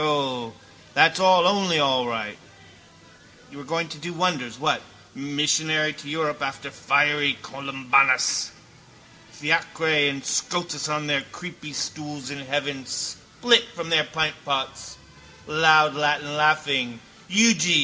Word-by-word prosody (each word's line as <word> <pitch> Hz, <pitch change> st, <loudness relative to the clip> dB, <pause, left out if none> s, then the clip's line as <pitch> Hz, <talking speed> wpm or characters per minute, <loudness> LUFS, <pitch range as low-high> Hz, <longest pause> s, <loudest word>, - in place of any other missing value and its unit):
O, 135 Hz, -6 st, -1 dB, 0.4 s
that's 165 Hz, +2 st, +5 dB
all 185 Hz, -2 st, +5 dB
only 190 Hz, -4 st, +2 dB
all 130 Hz, -4 st, +2 dB
right. 110 Hz, -3 st, -4 dB, 1.1 s
You 140 Hz, -, -12 dB
were -, -, -10 dB
going 165 Hz, +4 st, -3 dB
to 155 Hz, -1 st, -9 dB
do 175 Hz, +3 st, -7 dB
wonders, 145 Hz, -9 st, -2 dB
what? 155 Hz, +2 st, 0 dB, 0.3 s
Missionary 155 Hz, +2 st, 0 dB
to 150 Hz, -1 st, -11 dB
Europe 150 Hz, -1 st, -3 dB
after 140 Hz, 0 st, -5 dB
fiery 145 Hz, 0 st, +2 dB
Columbanus. 135 Hz, -1 st, +1 dB, 0.8 s
Fiacre 160 Hz, +1 st, -1 dB, 0.2 s
and 140 Hz, -1 st, -6 dB
Scotus 175 Hz, -4 st, -2 dB
on 150 Hz, 0 st, -2 dB
their 145 Hz, -2 st, +1 dB
creepystools 150 Hz, -4 st, -7 dB
in 140 Hz, -, -7 dB
heaven 140 Hz, 0 st, -3 dB
spilt 235 Hz, -, +1 dB
from 170 Hz, -1 st, -6 dB
their 155 Hz, -2 st, +4 dB
pintpots, 150 Hz, -3 st, -3 dB, 0.5 s
loudlatinlaughing: 150 Hz, -3 st, +2 dB, 0.3 s
_Euge! 205 Hz, -4 st, +4 dB
150 Hz, 110 wpm, -23 LUFS, 140-160 Hz, 1.1 s, that's